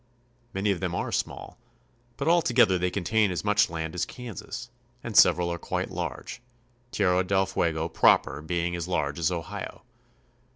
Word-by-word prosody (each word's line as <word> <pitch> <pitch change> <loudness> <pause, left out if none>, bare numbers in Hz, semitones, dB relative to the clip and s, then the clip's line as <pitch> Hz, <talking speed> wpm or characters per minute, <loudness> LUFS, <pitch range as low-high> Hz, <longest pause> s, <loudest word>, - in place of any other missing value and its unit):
Many 100 +1 0
of 95 - -2
them 90 -2 -2
are - - -2
small, - - -4 0.6
but 140 - -3
all 170 +1 +5
together 120 - +3
they 90 +1 +1
contain 105 +3 +1
as 90 +2 -3
much 105 -2 +3
land 80 -1 -4
as 90 - -1
Kansas, 120 0 -7 0.3
and 120 -3 -6
sev 90 -3 +7
eral 85 -1 -1
are 85 - -5
quite - - -3
large, - - -5 0.5
Tierra 95 -4 +2
del 95 +1 +2
Fuego 80 -4 -1
proper 80 - +3
being 85 +2 -2
as 85 0 -4
large 75 -5 -1
as 85 +1 +1
Ohio. 85 -3 -6
90 Hz, 170 wpm, -27 LUFS, 85-105 Hz, 0.6 s, sev